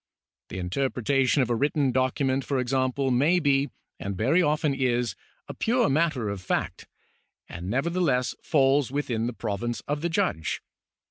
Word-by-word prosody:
The - - -6
interpretation 130 +7 +1
of 120 - -2
a - - +2
written 140 +2 +1
document, 130 +1 +1
for 140 - -1
example, 130 +1 0
may 145 +9 +3
be, 140 -2 +2 0.3
and 100 -1 -4
very 135 - +3
often 150 -2 +1
is, 125 -5 0 0.3
a - - -6
pure 240 +1 +1
matter 140 -5 +1
of 100 -2 -4
fact, 95 - -2 0.6
and 85 +3 -7
nevertheless 135 - +1
falls 140 -2 +2
within 120 -5 -1
the 120 - -3
province 115 +1 -3
of 145 0 -3
the 170 - 0
judge. 80 - -1
135 Hz, 150 wpm, -26 LUFS, 120-145 Hz, 0.6 s, may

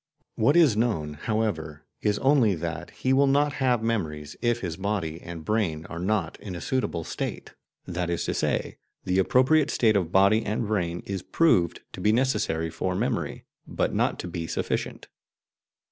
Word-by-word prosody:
What 140 +8 +3
is 160 -10 +6
known, 105 -10 0
however, 80 -5 -2 0.2
is 105 -1 +1
only 130 -8 +4
that 85 -1 -5
he 130 - -1
will 140 +1 +4
not 145 +1 +3
have 125 -3 +2
memories 80 -10 -2
if 120 0 +1
his 85 -4 -3
body 95 -4 -3
and 85 -2 -8
brain 90 -8 0
are 85 - -5
not 95 -3 -1
in 95 -4 -7
a - - -5
suitable 90 -6 -1
state. - - -5 0.3
That 90 -1 -3
is 85 - -1
to - - -1
say, - - -1 0.2
the 90 +1 +1
appropriate 130 +9 +4
state 110 -3 +3
of 90 -4 0
body 100 +4 +4
and 110 +2 -1
brain 90 -5 -1
is 95 -2 -3
proved 95 - +2
to - - -7
be 105 - +3
necessary 105 -10 0
for 90 +3 -2
memory, 120 +4 -2 0.2
but - - -1
not - - +1
to - - -6
be 85 -1 -4
sufficient. - - -3
100 Hz, 175 wpm, -26 LUFS, 85-115 Hz, 0.3 s, is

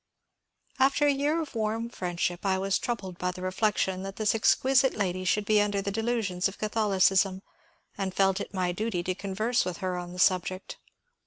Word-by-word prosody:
^^ - - +5
After 275 +2 +3
a 290 - +5
year 290 +4 0
of 300 - -11
warm 225 0 -1
friendship 175 -5 -3
I 190 -1 +1
was 195 0 0
troubled 195 -7 -4
by 180 - 0
the 180 0 -6
reflection 190 -1 0
that 195 0 -6
this 215 -2 +1
exquisite 265 +4 +3
lady 185 -3 -1
should 205 +3 +1
be 210 0 +4
under 205 -1 0
the 200 0 -2
delusions 220 -4 0
of 195 - -9
Catholicism, 195 -3 +2 0.6
and 190 -1 -1
felt 195 +1 +2
it - - -6
my 185 -2 -1
duty 185 -1 -2
to 185 - -1
converse 205 +5 -1
with 180 -2 -4
her 185 -2 -2
on 175 0 -7
the 180 - -9
subject. 185 0 0
195 Hz, 190 wpm, -28 LUFS, 185-220 Hz, 0.6 s, ^^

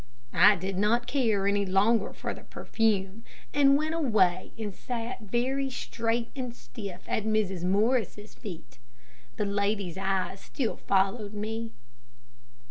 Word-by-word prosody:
I 210 - +7
did 190 +1 -3
not 230 +4 +2
care 225 -8 +1
any 200 0 +2
longer 200 +4 +3
for - - -4
the - - -11
perfume, 215 -1 -1 0.3
and 280 -1 +6
went 310 +2 -1
away 210 - +2
and 210 -3 -4
sat 240 +3 -5
very 255 +6 0
straight 230 -2 -2
and 250 -3 -4
stiff 180 - -8
at 220 - 0
Mrs. 210 -5 0
Morris' 210 +2 +1
feet. 165 - -9 0.6
The 210 - 0
lady's 200 -3 -1
eyes 190 0 -1
still 240 +2 -3
followed 200 +2 +1
me. 225 +2 -4
210 Hz, 130 wpm, -28 LUFS, 195-235 Hz, 0.6 s, I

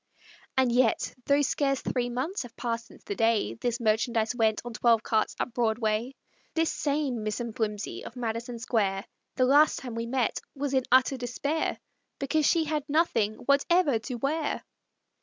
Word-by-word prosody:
And 260 -2 +4
yet, 240 -2 +2
though 285 +1 +4
scarce 275 -1 +1
three 245 -1 -1
months 265 +11 -2
have 240 -3 -10
passed 230 -1 -3
since - - -17
the - - -4
day 225 - +2
This 240 - -2
merchandise 225 0 +1
went, 220 -3 +2
on 240 - -6
twelve 230 0 +3
carts, 220 -1 0
up 245 - -2
Broadway, 225 +1 0 0.4
This 325 -1 +1
same 280 -5 -1
Miss 215 +1 -2
M'Flimsey 220 -3 -3
of 235 - -9
Madison 235 0 -3
Square, 210 -4 0 0.3
The 255 - +3
last 290 +3 +5
time 250 -3 -6
we 230 0 -3
met 250 -1 0 0.2
was 280 0 -2
in 260 -1 +2
utter 260 +1 +5
despair, 270 +6 -2 0.4
Because 295 +2 +1
she 335 -2 +3
had 305 -1 -1
nothing 240 -9 +2
whatever 280 -1 +3
to 245 +3 -5
wear! 290 +5 -1
245 Hz, 165 wpm, -28 LUFS, 225-280 Hz, 0.4 s, last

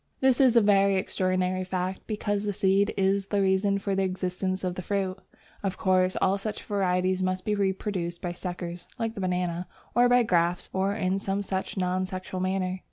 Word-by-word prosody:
This 265 0 +4
is 255 -3 +5
a 235 - +7
very 200 -1 +4
extraordinary 185 0 0
fact, 185 0 -3
because 205 -1 -1
the 205 - -1
seed 195 +1 +2
is 195 0 +2
the 205 - 0
reason 195 +1 +2
for 200 0 -2
the 195 - +1
existence 185 0 -2
of 180 -1 -1
the 185 - -5
fruit. 190 -1 -1 0.5
Of 195 -2 -2
course, 185 -1 +2
all 195 +1 +2
such 210 +1 -5
varieties 185 -2 +1
must 185 0 -1
be 210 - +1
reproduced 190 -3 -1
by 175 -1 -3
suckers 175 -1 -6
(like 225 -2 -2
the 205 - -6
banana) 180 -1 -1 0.3
or 245 +1 +5
by 245 0 +5
grafts, 175 -4 +1
or 195 +1 0
in 190 -2 0
some 195 +1 -2
such 190 +1 -3
non 185 0 0
sexual 185 0 -5
manner. 185 0 -1
190 Hz, 190 wpm, -27 LUFS, 185-200 Hz, 0.5 s, a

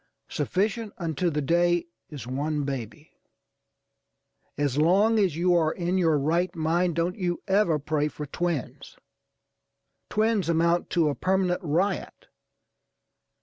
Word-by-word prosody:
Sufficient 210 +3 -1
unto 170 0 -1
the 150 -2 -2
day 175 +3 +2 0.2
is 140 -7 -8
one 145 +4 -2
baby. 135 +2 -6 1.5
As 145 -3 0
long 200 +8 +4
as 190 -7 +1
you 175 +2 +2
are 160 -2 +3
in 180 +2 -1
your 165 -4 +3
right 170 +6 0
mind 170 +2 0
don't 170 +3 -1
you 175 -2 -2
ever 190 -5 +3
pray 150 +1 -1
for 150 0 -6
twins. 170 -2 -4 1.1
Twins 215 -5 +1
amount 170 +1 +2
to 165 -4 +2
a - - -1
permanent 185 +2 0
riot. 180 - -2
170 Hz, 125 wpm, -26 LUFS, 150-185 Hz, 1.5 s, long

